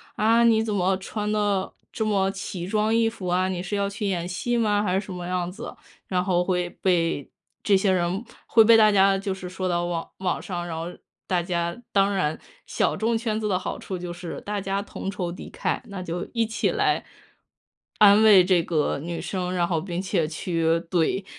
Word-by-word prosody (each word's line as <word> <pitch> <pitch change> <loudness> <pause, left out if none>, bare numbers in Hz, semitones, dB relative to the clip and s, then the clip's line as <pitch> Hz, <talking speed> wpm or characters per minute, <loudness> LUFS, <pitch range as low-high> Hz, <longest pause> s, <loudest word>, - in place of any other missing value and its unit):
“啊， 225 +2 +4
你 225 -1 +4
怎 220 -1 -2
么 190 -1 +1
穿 210 +2 -4
的 205 -3 0 0.2
这 220 - -1
么 195 -2 +1
奇 195 -2 -5
装 215 +2 +1
异 230 0 +3
服 205 -5 -7
啊， 180 +1 +2
你 180 -2 -3
是 190 +3 -3
要 200 0 0
去 200 +1 -3
演 175 -3 -1
戏 240 +7 -1
吗？” 210 -3 +2
还 190 -2 +1
是 200 - -7
什 190 - -7
么 175 -1 -6
样 180 -1 -2
子， 225 +6 -8 0.3
然 180 -1 0
后 180 -2 +2
会 180 -1 0
被 165 -6 +1 0.3
这 200 -2 +4
些 190 0 +2
人 185 +3 0 0.2
会 225 - +6
被 230 +1 +7
大 215 -1 +6
家 195 -1 +5
就 195 0 -2
是 185 -1 -7
说 185 0 -3
到 175 0 0
网 170 -1 -3
网 185 -2 -1
上， 175 -2 -4
然 165 - -4
后 165 +1 -4 0.4
大 180 -2 +1
家 170 -1 -2 0.2
当 200 0 +3
然 160 -6 -1 0.3
小 - - 0
众 225 +1 +1
圈 220 -2 -2
子 215 - -1
的 190 -3 +1
好 185 - -5
处 190 - -5
就 175 0 -6
是 175 -1 -7
大 205 0 -3
家 195 +1 -1
同 200 -1 -6
仇 180 -3 -3
敌 175 - -9
忾， - - -2
那 195 -2 -7
就 175 0 -4
一 230 -1 +2
起 225 +1 -1
来 - - +1 1.0
安 205 0 +7
慰 205 -4 +8
这 180 -2 +3
个 155 -4 0
女 170 +3 -5
生， 180 -2 -3
然 175 -1 +1
后 165 -3 0
并 175 -1 -4
且 185 -4 0
去 165 +1 -2
怼 175 +3 0
190 Hz, 230 characters per minute, -25 LUFS, 175-205 Hz, 1.0 s, 慰